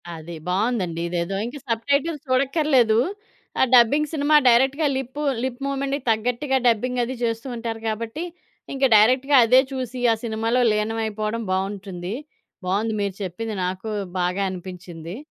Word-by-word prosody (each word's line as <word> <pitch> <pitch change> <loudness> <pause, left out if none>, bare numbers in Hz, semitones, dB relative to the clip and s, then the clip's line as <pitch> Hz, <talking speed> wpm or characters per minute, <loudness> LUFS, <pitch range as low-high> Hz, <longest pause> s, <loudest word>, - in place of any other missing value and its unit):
అది 165 +1 -8
బావుందండి. 185 -4 0
ఇదేదో 175 +2 -2
ఇంక 245 +5 -6
సబ్‌టైటిల్స్ 280 +7 0
చూడక్కర్లేదు. 260 -4 +3 0.6
ఆ - - +7
డబ్బింగ్ 280 +5 +4
సినిమా 300 0 +2
డైరెక్ట్‌గా 265 +6 +3
లిప్ 265 +2 -5 0.2
లిప్ 260 0 -4
మూవ్‌మెంట్‌కి 275 0 -2
తగ్గట్టుగా 245 +5 0
డబ్బింగ్ 245 +2 +1
అది 255 +2 -4
చేస్తూ 230 +2 -2
ఉంటారు 230 -1 -5
గాబట్టి 225 +8 -3 0.5
ఇంక 275 0 -3
డైరెక్ట్‌గా 255 +6 +4
అదే 250 +3 +6
చూసి, 255 -2 -4
ఆ - - 0
సినిమాలో 225 +2 0
లీనమైపోవడం 215 +1 -2
బావుంటుంది. 190 -1 -3 0.5
బావుంది 205 +5 0
మీరు 200 -2 -2
చెప్పింది. 215 +4 -4
నాకు 185 +4 -4 0.3
బాగా 180 +2 0
అనిపించింది. 180 -1 -8
230 Hz, 130 wpm, -23 LUFS, 200-260 Hz, 0.6 s, ఆ